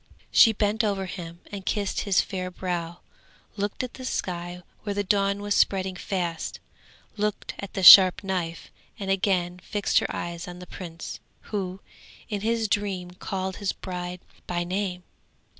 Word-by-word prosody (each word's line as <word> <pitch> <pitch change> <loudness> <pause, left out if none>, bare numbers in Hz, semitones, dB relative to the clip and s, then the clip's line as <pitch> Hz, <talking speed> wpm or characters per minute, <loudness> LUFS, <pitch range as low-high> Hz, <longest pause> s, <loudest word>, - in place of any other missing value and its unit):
She 225 - +8
bent 215 +1 +1
over 200 -2 0
him 170 -2 -8
and 200 -2 -6
kissed 200 +1 -1
his 200 -3 +3
fair 185 -2 -4
brow, 175 -2 -4 0.5
looked 205 +3 -2
at 250 - -5
the 260 - -9
sky 180 -6 -3 0.2
where 205 -1 -3
the 205 - 0
dawn 200 0 +1
was 205 0 0
spreading 190 -2 +2
fast, 175 -4 -3 0.6
looked 210 0 -2
at 200 - -7
the 190 - -2
sharp 185 +1 +11
knife, 180 -4 -3 0.3
and 195 -1 -2
again 180 -2 +1
fixed 205 +2 +1
her - - -2
eyes 170 +1 -5
on 175 0 -8
the 180 - -9
prince, 170 -2 -8 0.3
who, 190 -1 -3 0.5
in 205 -3 -2
his 225 +1 +1
dream 195 -3 -1
called 190 +1 -4
his 200 - -1
bride 180 -1 -6 0.3
by 175 -1 -1
name. 180 0 -2
190 Hz, 160 wpm, -26 LUFS, 180-205 Hz, 0.6 s, sharp